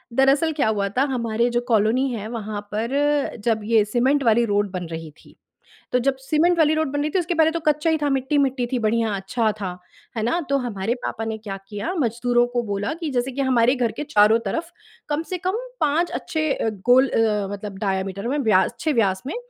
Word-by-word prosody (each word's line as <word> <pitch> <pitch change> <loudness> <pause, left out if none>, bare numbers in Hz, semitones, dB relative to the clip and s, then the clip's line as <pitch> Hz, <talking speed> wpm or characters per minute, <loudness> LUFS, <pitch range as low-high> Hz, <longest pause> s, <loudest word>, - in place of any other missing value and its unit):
दरअसल 275 +4 +3
क्या - - +3
हुआ 200 -2 0
था, 255 +7 +1
हमारे 235 0 0
जो 240 0 0
कॉलोनी 230 +4 +2
है 215 -1 -5
वहाँ 210 -1 -5
पर 280 +6 0
जब 225 -2 +1
ये 220 0 +3
सीमेंट 260 +6 +1
वाली 235 0 +4
रोड 205 -1 +1
बन 180 -2 -4
रही 160 -1 -6
थी। - - -19 0.6
तो 250 - +3
जब 270 +2 +1
सीमेंट 315 +6 +2
वाली 315 -2 +4
रोड 315 -3 0
बन 290 0 -1
रही 300 - 0
थी, 375 - +1
उसके 350 0 -1
पहले 320 0 +4
तो 335 - -2
कच्चा 305 0 +1
ही 320 - +2
था, 295 -1 -1
मिट्टी-मिट्टी 270 -1 +1
थी, 250 - +1
बढ़िया 225 0 +1
अच्छा 215 +3 0
था। 180 -2 -4 0.4
है 220 - -1
ना? 245 +10 +1
तो 280 - +3
हमारे 230 -4 -2
पापा 225 - -3
ने 220 0 -3
क्या 205 -3 -6
किया, 205 - -3
मज़दूरों 240 0 +2
को 240 -1 0
बोला 205 +1 -2
कि 320 - -2
जैसे 255 +1 -1
कि 275 - -3
हमारे 255 -1 +3
घर 240 -3 0
के - - -1
चारों 220 -6 +4
तरफ 335 +1 -3 0.4
कम 300 +2 -1
से 365 - -1
कम 380 +4 0 0.2
5 310 +4 +1
अच्छे 310 -2 -2
अ, 225 - -1 0.2
गोल 260 +2 +6
अ, 210 -4 +1
मतलब 205 -1 -6
डायामीटर 195 +1 -2
में 280 - 0
व्यास 210 -8 +3
अच्छे 310 - -2
व्यास 195 -6 +1
में - - -4
240 Hz, 220 wpm, -22 LUFS, 215-285 Hz, 0.6 s, गोल